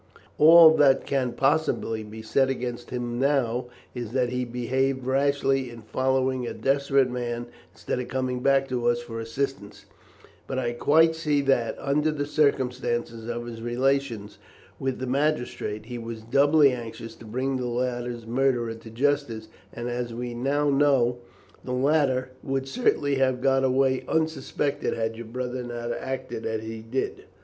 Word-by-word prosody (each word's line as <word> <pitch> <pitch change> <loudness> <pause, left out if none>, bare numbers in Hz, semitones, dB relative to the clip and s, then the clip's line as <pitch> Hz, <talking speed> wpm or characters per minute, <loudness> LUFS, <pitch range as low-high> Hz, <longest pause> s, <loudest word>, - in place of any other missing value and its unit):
"All 160 +1 +9
that 135 -2 +4
can 130 -3 0
possibly 135 -5 +1
be 110 +1 -9
said 135 +4 +2
against 120 -2 -4
him 120 -1 -3
now 130 -3 +1 0.3
is 120 -2 -6
that 125 -2 +1
he 125 0 -2
behaved 130 +2 -1
rashly 135 -1 +1
in 120 -1 -10
following 130 +1 0
a - - -5
desperate 135 -1 +2
man 120 -1 -3 0.3
instead 110 +4 -4
of 125 - -4
coming 130 -1 -2
back 135 +1 +3
to 120 -2 -1
us 120 0 +2
for 115 -1 -7
assistance; 115 -1 -4 0.6
but 130 - -3
I 120 -2 -1
quite 160 +6 +4
see 150 -3 0
that, 135 -4 +1
under 150 +3 +1
the 145 -1 -2
circumstance 130 -5 0
of 120 +1 -5
his 115 -1 -8
relations 120 -2 -1 0.4
with 135 -1 -2
the 130 - -4
magistrate, 125 -6 -1
he 120 0 -6
was 115 -1 -7
doubly 140 +4 +4
anxious 115 -2 -7
to - - -13
bring 130 +4 -2
the 125 -1 -3
latter's 120 -1 -3
murderer 120 -1 +1
to 115 0 -12
justice, 120 -3 -1 0.2
and, 120 +1 -5
as 120 -1 -3
we 120 0 -4
now 140 +4 +1
know, 135 -4 +3 0.4
the 125 - -4
latter 130 -1 +1
would 135 -1 -2
certainly 145 - +1
have 130 -1 +2
got 135 0 +2
away 130 0 +2
unsuspected 150 -2 -1
had 115 0 -2
your 115 0 -8
brother 125 +2 -4
not 120 -1 -5
acted 130 -2 -4
as 110 -1 -3
he 110 0 -6
did." 115 +4 -3
125 Hz, 160 wpm, -26 LUFS, 120-135 Hz, 0.6 s, All